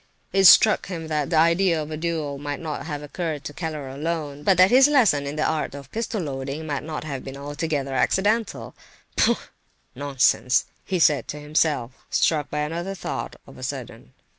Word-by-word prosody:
It 195 0 +4
struck 215 +3 +7
him 165 -4 -6
that 150 -2 -1
the 170 - 0
idea 170 +2 +3
of 150 0 -5
the 155 - -4
duel 155 -3 -3
might 145 0 -4
not 155 -1 -5
have 150 -2 -5
occurred 155 -1 -4
to 145 - -7
Keller 155 -4 -5
alone, 145 +1 -4
but 185 +4 +3
that 185 +3 +6
his 260 +2 +7
lesson 220 - +3
in 145 - -4
the 155 - 0
art 155 -3 -2
of 140 -2 -10
pistol 225 -3 -3
loading 140 +1 -5
might 150 +1 -4
have 140 -4 -5
been 135 - -8
not 140 - -9
altogether 145 -2 -2
accidental! 190 - 0 0.4
"Pooh! - - +3 0.6
nonsense!" 130 -3 +2 0.2
he 190 - -1
said 150 -4 +3
to 150 - -6
himself, 150 -4 0 0.2
struck 150 -3 +1
by 150 - -2
another 170 +6 -3
thought, - - -5
of - - -14
a - - -11
sudden. - - -7
155 Hz, 190 wpm, -24 LUFS, 145-170 Hz, 0.6 s, struck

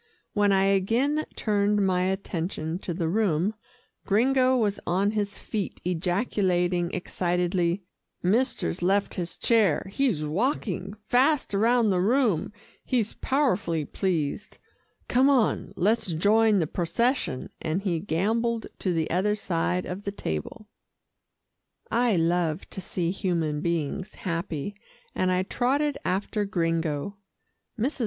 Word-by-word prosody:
When 205 -1 +3
I 195 0 +4
again 230 +11 +2
turned 205 -1 +1
my 180 -1 +2
attention 175 -3 -3
to 185 - -4
the 170 -1 -1
room, 190 0 +1 0.5
Gringo 255 +4 +3
was 210 -4 0
on 195 +4 +2
his 205 -2 -2
feet 210 -3 -4
ejaculating 180 -1 0
excitedly, 180 0 0 0.4
"Mister's 210 -2 +1
left 195 +3 +1
his 175 -2 -3
chair 220 -9 +3
he's 225 - +1
walking, 200 - -1
fast 270 0 +2
round 225 +2 +3
the 185 - +2
room 220 - +2 0.3
he's 235 -5 0
powerfully 200 - 0
pleased 175 -1 -2 0.5
come 260 +3 +4
on, 255 -6 +2
let's 205 -2 +1
join 210 +5 +4
the 170 - +2
procession," 175 - -1
and 170 +4 -1
he 175 -5 0
gambolled 220 +7 0
to 185 - 0
the 160 -1 0
other 195 +5 +2
side 180 -2 -1
of 185 +3 -5
the 200 - -3
table. 195 - -5 1.2
I 235 -2 +3
love 170 0 +1
to 190 - -5
see 175 -2 -2
human 165 -6 -1
beings 170 +4 -2
happy, 170 -1 -3 0.4
and 185 0 +1
I 185 0 +2
trotted 275 +8 0
after 200 +3 -1
Gringo. 165 -1 -1 0.6
Mrs. 265 +7 -1
195 Hz, 125 wpm, -26 LUFS, 175-220 Hz, 1.2 s, I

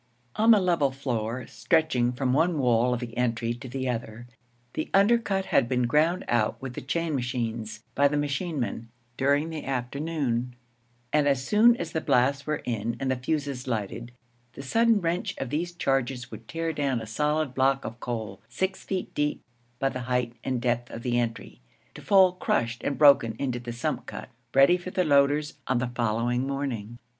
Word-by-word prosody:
On 220 +2 +3
the 220 -2 +8
level 170 -7 +2
floor, 125 -3 -3
stretching 155 -8 +1
from 125 0 -1
one 165 +3 +2
wall 125 -2 +3
of 125 0 -1
the 115 -2 -6
entry 115 -1 0
to 125 +2 -9
the 130 +1 -3
other, 115 -1 -4 0.5
the 155 - -3
undercut 200 -1 +3
had 120 - +2
been 125 -1 +1
ground 155 +8 +2
out 110 -3 +1
with 130 -2 -6
the - - -6
chain 165 +4 -2
machines 115 -4 -3
by 140 +1 +4
the 145 +1 -1
machine 145 +2 -2
men 115 0 -4 0.3
during 145 +5 +1
the 155 -2 -5
afternoon; 130 -1 -2 0.6
and 150 -1 +3
as 135 -2 +1
soon 230 +3 +5
as 170 -5 -4
the 160 - -1
blasts 140 +3 +2
were 150 0 -2
in 115 -1 -2
and 135 -1 -1
the - - +1
fuses 135 0 -3
lighted, 115 +1 -3 0.4
the 135 - -8
sudden 225 - +3
wrench 170 +1 -2
of 120 - -4
these 170 +4 -1
charges 135 -6 -1
would 115 - -10
tear 165 0 -2
down 140 -4 0
a 110 - -6
solid 150 +5 0
block 135 +1 +2
of 115 +2 -6
coal 110 -6 -5
six 190 +9 -2
feet 190 -1 -4
deep 150 0 -1 0.3
by 135 - +1
the 130 - -5
height 125 -1 0
and 130 -2 -1
depth 120 0 0
of 115 - -8
the 120 -1 +1
entry, 115 - -4 0.3
to - - -10
fall 190 -2 +5
crushed 120 -9 -1
and 140 - -1
broken 140 -6 +6
into 130 -3 -2
the 120 0 -6
sump 120 +1 -3
cut, - - -7 0.3
ready 140 +6 +6
for 180 +1 -7
the 185 0 +1
loaders 145 0 +2
on 130 - +2
the 120 0 -2
following 120 +2 0
morning. 125 -5 -4
130 Hz, 190 wpm, -27 LUFS, 120-150 Hz, 0.6 s, the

